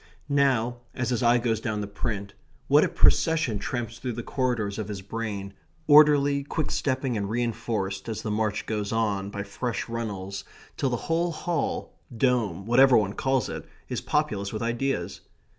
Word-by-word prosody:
Now, 130 -4 +2 0.2
as 125 -1 -1
his 125 - 0
eye 120 0 +5
goes 115 -2 0
down 110 -3 -2
the - - -2
print, 100 0 -4 0.3
what 145 +2 +6
a - - +1
procession 160 -10 +3
tramps 115 +1 -4
through 125 -2 -3
the 120 +1 -5
corridors 115 -7 -1
of 105 - -3
his 100 -2 -6
brain, 100 -2 -4 0.3
orderly, 145 -2 +6
quick 150 +2 -2
stepping, 130 -2 0
and 100 -2 -2
reinforced, 115 -4 -2
as 110 - -4
the 105 - -2
march 105 0 -1
goes 105 -2 -2
on, 105 -3 0
by 100 0 -4
fresh 110 +3 -3
runnels, 100 -5 -4 0.3
till 135 - 0
the 120 - 0
whole 170 +1 +1
hall, 165 -1 -2 0.2
dome, 110 -7 +1
whatever 125 +3 +6
one 100 -2 +1
calls 135 -1 +1
it, - - -5 0.3
is - - -2
populous 100 -1 -1
with 110 +1 -3
ideas. 120 +4 -2
115 Hz, 170 wpm, -26 LUFS, 105-130 Hz, 0.3 s, what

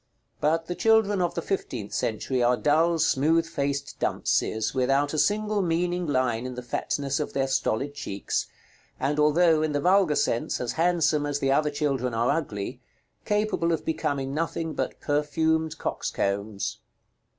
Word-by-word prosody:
But 165 +2 +1
the 175 - -3
children 205 +1 +3
of 175 - 0
the 170 - -2
fifteenth 125 - -3
century 125 +3 -1
are 120 +1 +3
dull 160 +7 +3
smooth 160 +2 +2
faced 140 -2 -3
dunces, 110 0 0
without 135 +3 +1
a 155 - 0
single 210 +2 +1
meaning 175 0 0
line 130 -3 0
in 125 - -6
the 125 - -6
fatness 140 +3 -2
of 150 - -3
their 135 -1 +1
stolid 135 +1 -1
cheeks; 100 -8 -3 0.5
and, 145 +3 0
although, 155 +1 +4
in 155 -1 0
the 145 - +1
vulgar 180 -1 +3
sense, 115 - 0
as 120 -2 -2
handsome 155 -1 +2
as 145 -1 -1
the 135 -1 0
other 150 +2 +3
children 135 -5 -1
are 115 +2 +2
ugly, 125 -10 -3 0.4
capable 210 -5 +1
of 165 - -1
becoming 140 -4 -2
nothing 165 +1 -2
but - - -3
perfumed 160 +2 0
coxcombs. 100 +1 -2
150 Hz, 155 wpm, -26 LUFS, 130-165 Hz, 0.5 s, although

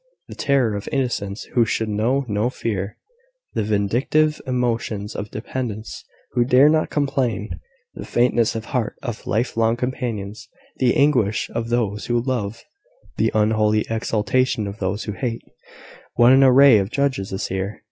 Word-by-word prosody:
The - - -7
terror 135 -6 +1
of 100 - -5
innocents 120 -7 -2
who 120 - +4
should 110 0 -1
know 115 +6 0
no 105 +2 0
fear 105 -5 -4 0.6
the - - 0
vindictive 120 +9 +1
emotions 115 -5 -2
of 105 - -5
dependants 110 0 -5 0.3
who 120 - +2
dare 130 +4 +5
not 155 0 +2
complain 135 -7 -1 0.3
the - - -8
faintness 120 -2 +1
of 110 -1 -4
heart 125 -6 -2
of 120 -4 -6
life 115 +4 0
long 115 +1 +2
companions 120 -5 -4 0.3
the 125 -2 +2
anguish 125 -8 +2
of 115 0 -3
those 110 -4 -1
who 120 0 +1
love 115 -4 -3 0.5
the - - +2
unholy 110 0 +2
exultation 110 +1 0
of 100 +2 -7
those 95 +2 -2
who 105 - -4
hate, 115 +2 -4 0.7
what 120 +1 +6
an 135 +1 +6
array 135 -3 +7
of 100 0 -2
judges 130 -7 -1
is 95 - -3
here! 95 +3 -3
115 Hz, 155 wpm, -22 LUFS, 105-130 Hz, 0.7 s, array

